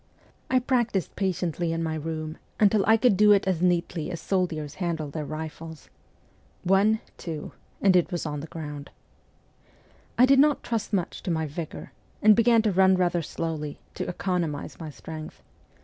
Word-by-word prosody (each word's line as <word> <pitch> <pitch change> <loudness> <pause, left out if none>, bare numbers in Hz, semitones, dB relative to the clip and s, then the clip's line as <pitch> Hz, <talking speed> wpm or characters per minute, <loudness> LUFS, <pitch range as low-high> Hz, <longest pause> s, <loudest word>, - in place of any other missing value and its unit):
I 260 - +3
practised 240 - 0
patiently 175 -3 -1
in 165 0 -1
my 160 -1 -1
room 155 0 -4 0.2
until 205 -1 +4
I 220 0 +6
could 230 -2 +4
do 210 +2 +6
it 200 0 +2
as 180 -3 0
neatly 175 -2 0
as 170 -3 -5
soldiers 165 -6 -1
handle 160 -4 -2
their 150 -1 -4
rifles. 160 0 -7 0.4
' - - -35
One, 215 +3 +3 0.2
two,' 160 -3 -6 0.3
and 195 -2 +5
it 180 +1 +3
was 175 -2 -3
on 150 -1 -3
the 155 - -7
ground. 150 -3 -7 1.3
I 250 - +7
did 270 +1 +5
not 295 0 +4
trust 230 -3 -2
much 190 -4 -2
to - - -5
my 160 -2 0
vigour, 155 +2 -7 0.3
and 215 0 +6
began 230 0 +4
to 215 - +2
run 190 0 +5
rather 175 -1 +1
slowly, 155 -2 -4 0.2
to - - -4
economize 175 -5 -3
my 160 -2 -6
strength. 155 +1 -9
175 Hz, 170 wpm, -26 LUFS, 160-200 Hz, 1.3 s, I